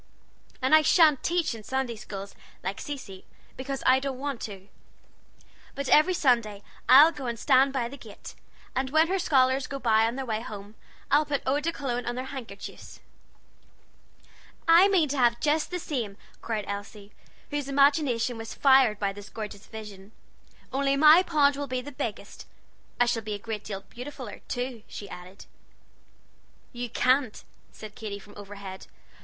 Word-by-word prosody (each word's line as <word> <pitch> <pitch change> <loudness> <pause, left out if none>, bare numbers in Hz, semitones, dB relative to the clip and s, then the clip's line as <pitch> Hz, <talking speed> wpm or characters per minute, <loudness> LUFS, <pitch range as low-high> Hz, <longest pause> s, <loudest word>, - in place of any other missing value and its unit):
And 260 - +2
I 310 - +8
shan't 305 -2 +5
teach 340 -5 0
in 225 - -8
Sunday 260 +1 -2
schools, 200 -2 -8 0.3
like 190 +2 -4
Cecy, 260 -10 -7 0.3
because 270 +1 -5
I 260 +1 +5
don't 270 -1 -4
want 275 -2 -4
to; 195 -1 -11 1.1
but 280 0 -4
every 335 +5 +5
Sunday 230 -9 +1 0.3
I'll 290 +5 +9
go 275 -5 -7
and 235 -1 -3
stand 270 +2 +4
by 260 -3 -1
the 275 +4 -10
gate, 220 -5 -11 0.4
and 260 0 -1
when 315 +3 +3
her 385 +1 0
scholars 265 -4 +2
go 275 - -5
by 225 -3 +3
on 235 - -3
their 270 0 -4
way 220 -2 -2
home, 205 -2 -9 0.4
I'll 290 +2 +5
put 285 -2 -3
Lubin's 290 +4 0
Extracts 250 -7 -2
on 240 - -3
their 255 +1 -4
handkerchiefs." 240 -7 -9 1.7
"I 335 +4 +7
mean 370 -6 +3
to 280 0 -2
have 235 -1 +3
just 305 +3 +1
the 360 - -3
same," 245 - -4 0.2
cried 215 -3 -3
Elsie, 200 0 -7 0.4
whose 290 -1 -3
imagination 275 -4 +2
was 225 0 -7
fired 265 -6 +5
by 200 -1 -1
this 205 +1 -11
gorgeous 210 -2 -8
vision, 210 -2 -10 0.6
"only 275 +1 +1
my 310 +4 +8
pond 295 -6 +3
will 285 0 -4
be 255 -1 -2
the 290 +3 -9
biggest. 230 -7 -6 0.5
I 245 - +5
shall 240 -1 0
be 210 -1 -4
a - - -4
great 215 0 -6
deal 195 -2 -6
beautifuller, 250 +1 -9
too," 245 -2 -4
she 205 - -8
added. 180 +2 -11 1.3
"You 245 0 -5
can't," 255 -1 +1 0.3
said 215 -1 -10
Katy 210 -2 -6
from 205 +1 -15
overhead. 200 -2 -9
255 Hz, 165 wpm, -27 LUFS, 215-280 Hz, 1.7 s, I'll